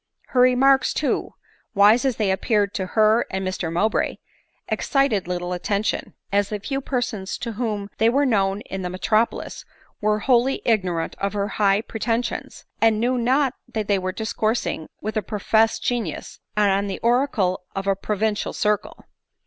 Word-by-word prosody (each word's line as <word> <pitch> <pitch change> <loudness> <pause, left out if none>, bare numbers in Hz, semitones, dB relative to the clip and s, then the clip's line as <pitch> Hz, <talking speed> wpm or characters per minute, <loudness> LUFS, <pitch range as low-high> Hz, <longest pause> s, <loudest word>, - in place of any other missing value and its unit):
Her 250 - +3
remarks, 265 +2 +4
too, - - -1 0.4
wise 210 +6 +5
as 260 -3 +1
they 210 -3 +1
appeared 205 +1 +1
to 190 - -2
her 220 +2 +4
and 190 0 -3
Mr 180 -3 -3
Mowbray, 200 +6 +1 0.5
excited 275 - +1
little 180 0 -3
attention 200 +4 -2
— - - -45
as 200 0 +2
the 210 - -3
few 270 +7 -3
persons 240 -7 -3
to 235 - -4
^ - - -8
whom 210 -3 -2
they 225 +1 +5
where. 280 +4 +2
know 195 -6 +2
in 190 -2 -6
the 180 - -3
metropolis 215 +5 -1 0.4
where 210 0 +1
wholly 250 +3 +2
ignorant 180 -7 0
of 200 +1 -1
her 205 0 -1
high 200 -1 +2
pretensions, 230 +2 -3 0.2
and 220 -1 +4
knew 245 +3 +1
not 260 +3 +2 0.2
that 215 -2 -3
they 200 -2 +2
were 185 0 -2
discoursing 220 -4 -2
with 215 +1 -3
a - - +2
professed 220 +2 +1
genius, 230 -10 -3 0.2
and 200 -1 +2
the 190 - -3
oracle 235 -7 +1
of 195 0 -3
a 195 0 +2
provincial 210 +1 -1
circle. 210 0 -1
215 Hz, 165 wpm, -23 LUFS, 195-235 Hz, 0.5 s, wise